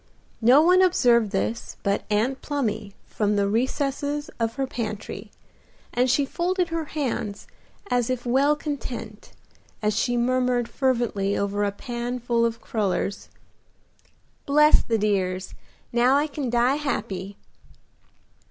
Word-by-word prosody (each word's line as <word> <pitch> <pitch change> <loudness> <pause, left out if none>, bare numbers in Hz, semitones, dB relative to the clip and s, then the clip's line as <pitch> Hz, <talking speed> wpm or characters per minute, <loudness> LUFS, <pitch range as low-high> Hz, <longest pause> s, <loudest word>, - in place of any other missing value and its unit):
No 255 +7 +6
one 365 +2 +5
observed 240 - +4
this 210 +4 -3
but 200 -1 0
Aunt 230 +6 0
Plumy 220 -8 -3
from 210 -1 0
the 200 -1 +2
recesses 280 +6 -1
of 230 0 -1
her 270 - -1
pantry, 215 -5 -5 0.6
and 250 +1 +2
she 275 +3 +3
folded 355 +4 -1
her 330 -1 -2
hands 240 -9 -3 0.5
as 245 -1 +1
if 255 -1 -2
well 275 +5 +3
content, 255 -8 -6 0.5
as 210 -1 0
she 245 +2 +1
murmured 250 0 +1
fervently 235 -8 0
over 200 +1 -1
a 200 - +1
pan 240 +3 -4
full 235 -1 +1
of 230 0 -5
crullers, 200 -3 -2 1.2
"Bless 300 +2 +6
the 225 - 0
dears! 190 -3 -1 0.4
Now 245 +3 +4
I 290 +1 +3
can 285 -4 -4
die 245 +4 +2
happy." 200 -9 -3
240 Hz, 130 wpm, -25 LUFS, 210-275 Hz, 1.2 s, No